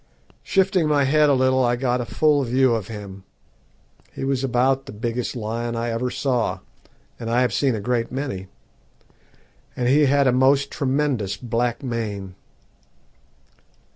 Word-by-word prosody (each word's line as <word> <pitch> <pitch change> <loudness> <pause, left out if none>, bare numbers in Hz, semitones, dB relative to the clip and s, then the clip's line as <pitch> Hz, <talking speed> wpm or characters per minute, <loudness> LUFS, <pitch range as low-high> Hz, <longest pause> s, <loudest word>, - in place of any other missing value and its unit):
Shifting 190 -4 +1
my 145 -2 +3
head 150 +2 +3
a 140 - +4
little 130 0 +2
I 120 0 +2
got 125 0 0
a - - -4
full 150 +3 +2
view 130 0 +2
of 110 -4 -2
him. 100 -3 -9 0.9
He - - -7
was 135 -1 -1
about 135 +2 +1
the - - -7
biggest 115 +4 -3
lion 115 +1 -3
I 115 0 -2
ever 120 +2 -1
saw, 125 -3 -1 0.6
and 115 - -5
I 120 +2 +2
have 125 -5 +1
seen 130 +3 +1
a - - -3
great 115 +2 -1
many, 130 -8 -4 1.3
and 125 - -1
he 145 +3 +4
had 140 +1 +3
a 130 - +4
most 135 +2 +3
tremendous 135 -7 -1
black 120 +1 -2
mane. 105 -6 -4
125 Hz, 155 wpm, -22 LUFS, 115-135 Hz, 1.3 s, a